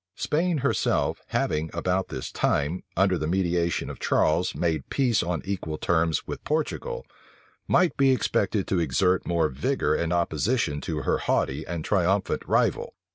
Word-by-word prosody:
Spain 170 +2 0
herself, - - +1
having 75 +1 -1
about 90 +2 0
this - - -6
time, 75 +6 0 0.2
under 95 -3 +3
the 75 - -2
mediation 85 -1 0
of - - -7
Charles, 85 +4 +1
made 80 -5 -1
peace 125 -5 +2
on 85 -2 -2
equal 90 -6 -3
terms 80 -1 +1
with - - -6
Portugal, 475 - -2 0.6
might 180 -2 +3
be 135 -1 +4
expected 105 -5 +1
to 95 - 0
exert 85 +5 +1
more 85 -2 +2
vigor 65 -1 0
and 85 0 -1
opposition 85 - 0
to 75 -3 -3
her - - +1
haughty - - -1
and 85 -2 -4
triumphant 95 0 +1
rival. - - +1
90 Hz, 150 wpm, -26 LUFS, 80-100 Hz, 0.6 s, be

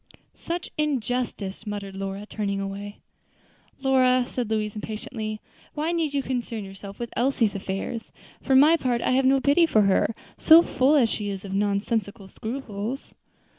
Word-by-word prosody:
"Such 345 +1 -5
injustice!" 245 -7 -2
muttered 200 -2 -5
Lora, 195 +1 -5
turning 200 -2 -3
away. 200 +1 -6 0.8
"Lora," 255 -2 +4
said 245 -4 -3
Louise, 215 -1 -1
impatiently, 215 0 -5 0.4
"why 310 +2 -1
need 320 -4 -1
you 275 - +1
concern 240 -4 -3
yourself 195 0 -10
with 235 -1 -6
Elsie's 240 -3 +2
affairs? 195 +4 -4 0.3
for 265 - +2
my 300 +5 +7
part, 245 -5 0
I - - +1
have 260 +1 +3
no 270 +1 +5
pity 290 +5 +4
for 215 -9 +4
her, 195 +3 +2 0.2
so 325 +2 +8
full 270 0 +3
as 260 -6 +5
she 210 -2 -3
is 195 0 -5
of 195 - -6
nonsensical 200 +1 -1
scruples." 225 +2 -5
225 Hz, 155 wpm, -25 LUFS, 200-265 Hz, 0.8 s, so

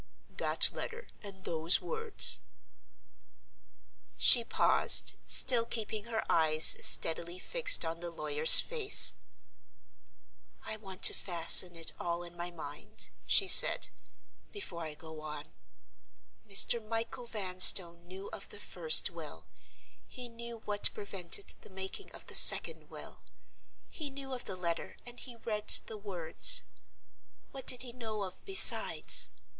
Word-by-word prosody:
"That - - +1
letter 475 0 -11
and 195 -3 -15
those 165 +1 -1
words." 450 -2 -1 1.8
She 240 - +2
paused, - - +2
still 245 -3 +3
keeping 220 -2 -8
her 225 -2 -8
eyes 155 -1 +4
steadily 170 +2 +1
fixed 485 - -1
on 165 +1 -9
the 175 0 -9
lawyer's 155 -1 +2
face. 450 -4 +4 1.5
"I - - -8
want 190 -3 -14
to - - +6
fasten 175 0 +1
it 165 -1 -3
all 170 0 -7
in 175 0 -13
my 175 0 -9
mind," 150 -4 -11 0.2
she 390 - +2
said - - +3 0.6
"before 195 - -11
I 155 -1 -11
go 160 0 -15
on. 150 -1 -12 1.0
Mr. 215 +3 +1
Michael 230 +3 -9
Vanstone 185 -4 +2
knew 190 +2 -13
of - - -12
the - - -14
first 475 -1 0
will; - - -14 0.6
he 250 -2 -12
knew 235 -1 -14
what 205 -1 +2
prevented 195 -2 -6
the - - -20
making 190 - -11
of - - -16
the - - -13
second - - +4
will; - - -15 0.7
he 305 -3 -10
knew 270 -1 -13
of 250 - -10
the 190 - -8
letter 170 -2 -8
and 245 0 -15
he 245 -3 -13
read 215 -2 -9 0.2
the 220 - -13
words. 200 - -3 0.9
What 270 -1 -14
did 250 -1 -1
he 245 -2 -13
know 220 -4 -10
of 185 -1 -13
besides? 390 -1 +3
200 Hz, 135 wpm, -27 LUFS, 170-240 Hz, 1.8 s, to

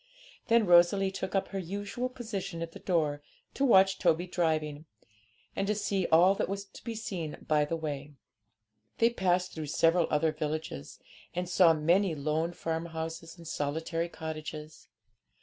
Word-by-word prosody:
Then 230 -2 +4
Rosalie 180 +2 +5
took 190 0 -4
up 195 - 0
her 195 - -3
usual 205 +7 -4
position 200 -9 -5
at 165 - -7
the - - -11
door, 155 -5 0 0.3
to 275 - -1
watch 195 -7 +5
Toby 165 +3 +2
driving, 155 -4 -1 0.7
and 195 - -1
to 210 - +1
see 195 -3 0
all 175 +4 +6
that 195 - -2
was 200 0 -3
to - - -15
be 230 -1 -4
seen 180 -8 -4
by 150 -1 +3
the 165 - -2
way. 145 -2 -5 0.8
They 230 +1 +4
passed 185 -4 +1
through 155 -2 -5
several 165 +3 +3
other 155 +1 +2
villages, 155 - -4 0.4
and 180 0 -2
saw 175 -1 +5
many 170 +3 +2
lone 155 +4 -1
farmhouses 165 0 -4
and 170 -1 -11
solitary 160 +3 -2
cottages. 155 -1 -7
170 Hz, 155 wpm, -30 LUFS, 155-195 Hz, 0.8 s, all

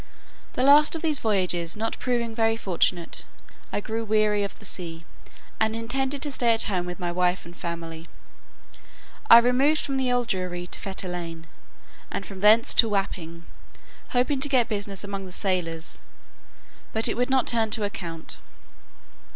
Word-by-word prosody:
The 250 - 0
last 295 +3 +6
of 325 - -5
these 305 -4 +3
voyages 180 -6 0
not 225 +1 -2
proving 235 -2 -1
very 225 0 +1
fortunate, 175 -3 0 0.5
I - - -1
grew 225 +2 -3
weary 215 -1 +2
of 200 - -5
the 210 - -12
sea, 170 -3 -3 0.5
and 220 0 +1
intended 265 +4 -2
to 295 - 0
stay 235 -3 +3
at 225 - +2
home 180 -3 -1
with 180 +1 -6
my 175 -1 -2
wife 180 +1 0
and 170 +1 -12
family. 165 -2 -6 1.2
I - - +11
removed 255 +6 +3
from 275 -1 -2
the 260 -1 +1
Old 245 -1 +1
Jewry 180 -2 -3
to - - -4
Fetter 190 -1 -4
Lane, 170 -2 -6 0.6
and - - -4
from 195 -2 -9
thence 215 +3 +5
to 225 - +5
Wapping, 170 -5 -3 0.6
hoping 260 +3 +1
to 285 - 0
get 250 -4 +3
business 200 -3 -3
among 195 -1 -5
the - - -11
sailors; 175 -4 -2 0.9
but 220 +1 +3
it - - +1
would 250 +2 0
not 260 -2 +3
turn 225 -2 +1
to 215 0 +1
account. 170 -6 -4
210 Hz, 165 wpm, -25 LUFS, 180-240 Hz, 1.2 s, I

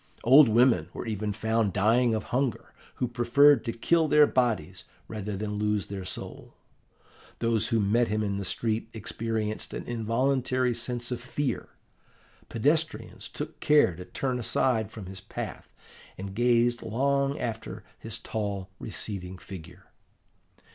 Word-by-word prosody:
Old 130 +2 +8
women 120 +3 +4
were - - -6
even 105 -2 -2
found 110 -1 0
dying 115 +4 +3
of 110 - -2
hunger, 130 -1 -1 0.2
who 125 - -1
preferred 120 +3 +5
to 115 - -1
kill 160 +8 +2
their 150 0 +6
bodies 115 - 0 0.2
rather 105 -2 -4
than 105 0 -3
lose 105 -1 0
their 95 -2 -6
soul. - - -7 0.8
Those 115 -2 +1
who 115 - +1
met 110 +4 +2
him 105 +1 0
in 100 -1 -1
the - - -3
street 110 +4 -1
experienced 110 0 -3
an - - -4
involuntary 125 +2 0
sense 120 +1 -2
of 120 -1 -3
fear. 130 +2 -3 0.8
Pedestrians 155 +7 -1
took - - -6
care 150 - +4
to 90 +2 -9
turn 125 +7 -2
aside 115 -1 +1
from 110 -3 -9
his 95 0 -8
path, - - -7 0.5
and 95 +1 -6
gazed 120 +1 +2
long 140 +4 0
after 115 -2 -5 0.2
his - - -4
tall, 100 -3 -4
receding 95 -3 -4
figure. 90 0 -11
115 Hz, 140 wpm, -28 LUFS, 105-125 Hz, 0.8 s, Old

